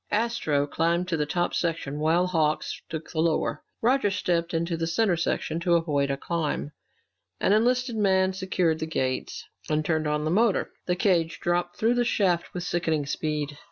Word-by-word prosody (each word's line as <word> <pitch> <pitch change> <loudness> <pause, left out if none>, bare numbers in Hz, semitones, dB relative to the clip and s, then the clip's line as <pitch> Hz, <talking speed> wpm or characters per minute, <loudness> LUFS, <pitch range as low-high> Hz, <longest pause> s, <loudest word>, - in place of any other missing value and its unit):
Astro 205 -10 +1
climbed 170 +4 0
to 165 - 0
the 150 -1 -1
top 175 +3 0
section 160 -4 -2
while 165 +4 +3
Hawks 160 -4 0
took 160 0 -6
the 160 - -3
lower. 160 -2 +1 0.2
Roger 250 -2 +3
stepped 175 -3 0
into 170 +1 -1
the 165 0 -2
center 190 +2 +2
section 165 -1 -1
to 170 0 +2
avoid 145 -4 +1
a 140 - -1
climb. 155 -1 -2 0.7
An 195 - +3
enlisted 245 +2 +2
man 190 -3 +2
secured 185 -4 0
the 160 - -3
gates 130 -5 -2 0.2
and 155 0 +1
turned 155 -1 0
on 150 0 0
the 155 - 0
motor. 215 +2 +2 0.2
The 180 - +2
cage 175 -3 +1
dropped 175 0 -1
through 225 +2 +3
the 245 0 +2
shaft 185 -7 +1
with 180 - -5
sickening 160 -4 0
speed. 150 0 -3
170 Hz, 180 wpm, -26 LUFS, 155-185 Hz, 0.7 s, while